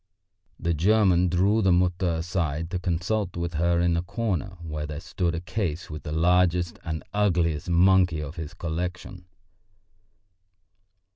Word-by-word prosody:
The 85 Hz, 0 st, 0 dB
German 90 Hz, +1 st, +3 dB
drew 100 Hz, +6 st, +2 dB
the 95 Hz, -2 st, +3 dB
Mutter 90 Hz, 0 st, +2 dB
aside 80 Hz, -1 st, -2 dB
to 90 Hz, -, -1 dB
consult 90 Hz, +2 st, -1 dB
with 85 Hz, 0 st, -3 dB
her 85 Hz, +2 st, +1 dB
in 85 Hz, -1 st, +2 dB
a 85 Hz, -, +1 dB
corner 95 Hz, -2 st, -3 dB
where 75 Hz, -2 st, -4 dB
there 75 Hz, 0 st, -5 dB
stood 85 Hz, -1 st, -2 dB
a -, -, -2 dB
case 90 Hz, -4 st, -3 dB
with 75 Hz, -1 st, -6 dB
the 75 Hz, -, -6 dB
largest 90 Hz, +1 st, +2 dB
and 80 Hz, -1 st, -4 dB
ugliest 85 Hz, -6 st, +1 dB
monkey 90 Hz, -1 st, +4 dB
of 75 Hz, +1 st, -6 dB
his 80 Hz, 0 st, -7 dB
collection. 90 Hz, +1 st, -5 dB
85 Hz, 145 wpm, -26 LUFS, 80-90 Hz, -, monkey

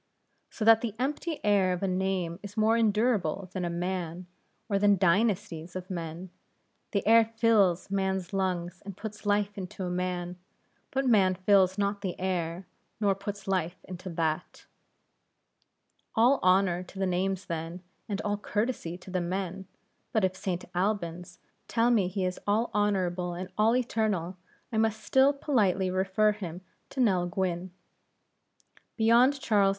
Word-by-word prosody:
So 215 Hz, -, -4 dB
that 225 Hz, 0 st, +7 dB
the 225 Hz, -3 st, -3 dB
empty 295 Hz, +5 st, -2 dB
air 200 Hz, -3 st, +3 dB
of 180 Hz, -, -4 dB
a -, -, +2 dB
name 185 Hz, -2 st, -1 dB
is 205 Hz, +1 st, -10 dB
more 220 Hz, +1 st, +4 dB
endurable 210 Hz, -5 st, +1 dB
than 185 Hz, -, -3 dB
a 175 Hz, -, -1 dB
man, 175 Hz, 0 st, -3 dB, 0.4 s
or 200 Hz, -3 st, +1 dB
than 205 Hz, 0 st, +4 dB
dynasties 185 Hz, -2 st, +1 dB
of 185 Hz, +1 st, -6 dB
men; 170 Hz, +1 st, -5 dB, 0.6 s
the 200 Hz, -, -1 dB
air 230 Hz, +1 st, +7 dB
fills 220 Hz, -5 st, +2 dB
man's 190 Hz, -1 st, -1 dB
lungs 180 Hz, -2 st, -2 dB
and 200 Hz, -2 st, -8 dB
puts 215 Hz, -1 st, -7 dB
life 205 Hz, 0 st, +1 dB
into 190 Hz, +1 st, -6 dB
a 180 Hz, -, -2 dB
man, 180 Hz, 0 st, -3 dB, 0.5 s
but 270 Hz, 0 st, -1 dB
man 195 Hz, -6 st, +4 dB
fills 190 Hz, 0 st, +3 dB
not 200 Hz, 0 st, 0 dB
the 190 Hz, -3 st, -4 dB
air, 180 Hz, -1 st, -2 dB, 0.3 s
nor 205 Hz, -2 st, +3 dB
puts 200 Hz, 0 st, -7 dB
life 185 Hz, -2 st, 0 dB
into 185 Hz, 0 st, -8 dB
that. 160 Hz, 0 st, -2 dB, 1.5 s
All 245 Hz, +5 st, +5 dB
honor 185 Hz, -1 st, +3 dB
to 185 Hz, +1 st, -12 dB
the 190 Hz, -, 0 dB
names 190 Hz, +1 st, -1 dB
then, 165 Hz, +1 st, -5 dB, 0.3 s
and 200 Hz, -1 st, -2 dB
all 205 Hz, 0 st, -1 dB
courtesy 210 Hz, -5 st, -2 dB
to 185 Hz, -, -12 dB
the 185 Hz, -1 st, 0 dB
men; 190 Hz, +1 st, -3 dB, 0.5 s
but 220 Hz, -4 st, +3 dB
if 185 Hz, 0 st, -1 dB
St. 185 Hz, -2 st, -3 dB
Albans 180 Hz, -2 st, -2 dB, 0.3 s
tell 235 Hz, +1 st, +2 dB
me 210 Hz, -6 st, +3 dB
he 190 Hz, 0 st, -2 dB
is 180 Hz, 0 st, -3 dB
all 215 Hz, +4 st, +1 dB
honorable 185 Hz, -4 st, 0 dB
and 185 Hz, +2 st, -6 dB
all 220 Hz, +3 st, +3 dB
eternal, 215 Hz, -8 st, 0 dB, 0.4 s
I 220 Hz, -, -2 dB
must 220 Hz, -1 st, 0 dB
still 265 Hz, +1 st, +4 dB
politely 205 Hz, -, +1 dB
refer 190 Hz, +3 st, +2 dB
him 180 Hz, -4 st, -6 dB, 0.3 s
to 270 Hz, -, -7 dB
Nell 190 Hz, -8 st, +3 dB
Gwynne. 185 Hz, -1 st, -2 dB, 1.3 s
Beyond 240 Hz, +5 st, +4 dB
Charles 205 Hz, -6 st, +3 dB
II. -, -, +4 dB
190 Hz, 155 wpm, -28 LUFS, 180-215 Hz, 1.5 s, that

